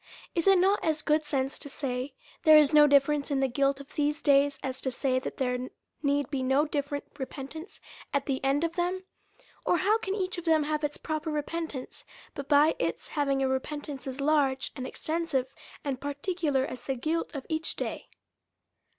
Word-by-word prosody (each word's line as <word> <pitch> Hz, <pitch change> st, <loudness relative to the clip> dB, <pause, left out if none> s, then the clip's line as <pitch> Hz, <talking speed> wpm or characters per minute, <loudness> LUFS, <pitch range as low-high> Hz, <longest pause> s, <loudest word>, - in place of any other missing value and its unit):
Is 335 Hz, +1 st, 0 dB
it 390 Hz, -1 st, +7 dB
not 385 Hz, +3 st, +3 dB
as 310 Hz, -1 st, +1 dB
good 305 Hz, 0 st, +2 dB
sense 270 Hz, -2 st, -1 dB
to 285 Hz, -, -7 dB
say, 260 Hz, -1 st, -3 dB, 0.3 s
there 310 Hz, -1 st, +8 dB
is 300 Hz, -1 st, +5 dB
no 300 Hz, -1 st, +8 dB
difference 285 Hz, +1 st, +3 dB
in 280 Hz, -2 st, +1 dB
the 270 Hz, -, +2 dB
guilt 275 Hz, +2 st, +1 dB
of 280 Hz, -, -12 dB
these 295 Hz, 0 st, 0 dB
days, 280 Hz, 0 st, +4 dB
as 260 Hz, 0 st, -3 dB
to 265 Hz, -, -1 dB
say 255 Hz, 0 st, 0 dB
that -, -, -6 dB
there 250 Hz, -1 st, -1 dB, 0.3 s
need 285 Hz, -2 st, +1 dB
be 275 Hz, -3 st, -1 dB
no 265 Hz, +3 st, +3 dB
different 285 Hz, -1 st, -2 dB, 0.2 s
repentance 275 Hz, +6 st, -7 dB, 0.3 s
at 280 Hz, -1 st, 0 dB
the 265 Hz, -2 st, -2 dB
end 275 Hz, +3 st, +2 dB
of 335 Hz, 0 st, 0 dB
them? 365 Hz, +1 st, -1 dB, 0.6 s
Or 355 Hz, -, +3 dB
how 415 Hz, +5 st, +3 dB
can 390 Hz, -3 st, -2 dB
each 370 Hz, -3 st, -1 dB
of 350 Hz, -, -10 dB
them 320 Hz, -2 st, +4 dB
have 305 Hz, +1 st, -2 dB
its 295 Hz, 0 st, -1 dB
proper 310 Hz, 0 st, -3 dB
repentance, 300 Hz, -2 st, -4 dB, 0.3 s
but 280 Hz, -2 st, -7 dB
by 295 Hz, +2 st, +5 dB
its 165 Hz, 0 st, -2 dB
having 275 Hz, -2 st, 0 dB
a -, -, +2 dB
repentance 275 Hz, +1 st, -3 dB
as 265 Hz, +1 st, -5 dB
large, 275 Hz, -2 st, +2 dB
and 260 Hz, -2 st, -4 dB
extensive, 310 Hz, -5 st, -2 dB, 0.3 s
and 270 Hz, -3 st, -3 dB
particular, 285 Hz, -1 st, -1 dB
as 255 Hz, -, -7 dB
the 270 Hz, -, -2 dB
guilt 315 Hz, +6 st, -1 dB
of 275 Hz, -, -5 dB
each 315 Hz, 0 st, 0 dB
day. -, -, -4 dB
285 Hz, 195 wpm, -29 LUFS, 270-315 Hz, 0.6 s, there